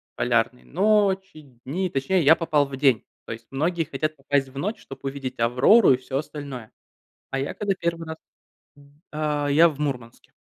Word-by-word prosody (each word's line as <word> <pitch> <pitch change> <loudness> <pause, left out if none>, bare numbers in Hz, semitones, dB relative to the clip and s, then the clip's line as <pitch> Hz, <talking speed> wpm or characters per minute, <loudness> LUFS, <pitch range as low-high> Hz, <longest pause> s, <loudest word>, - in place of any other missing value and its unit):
Полярные 120 +1 0
ночи, 195 -2 +1 0.2
дни, 180 +8 -2
точнее, 165 +6 0
я 160 +4 +7
попал 155 -3 +1
в 135 -1 -7
день. 130 -5 +2 0.2
То - - -5
есть 115 +1 -12
многие 165 +5 0
хотят 155 +1 -3
попасть 140 -1 0
в 135 - -13
ночь, 210 +9 -3
чтобы 135 - -12
увидеть 135 -2 -5
Аврору 125 - +5
и - - +1
все 130 +1 -4
остальное. 140 -5 -7 0.6
А 135 - -2
я 135 - -3
когда 205 -2 -1
1 165 -1 -2
раз 160 - -6 0.9
А, 150 -1 -1
я 160 +4 +5
в 150 - -10
Мурманске. 125 -6 -5
145 Hz, 170 wpm, -24 LUFS, 135-165 Hz, 0.9 s, я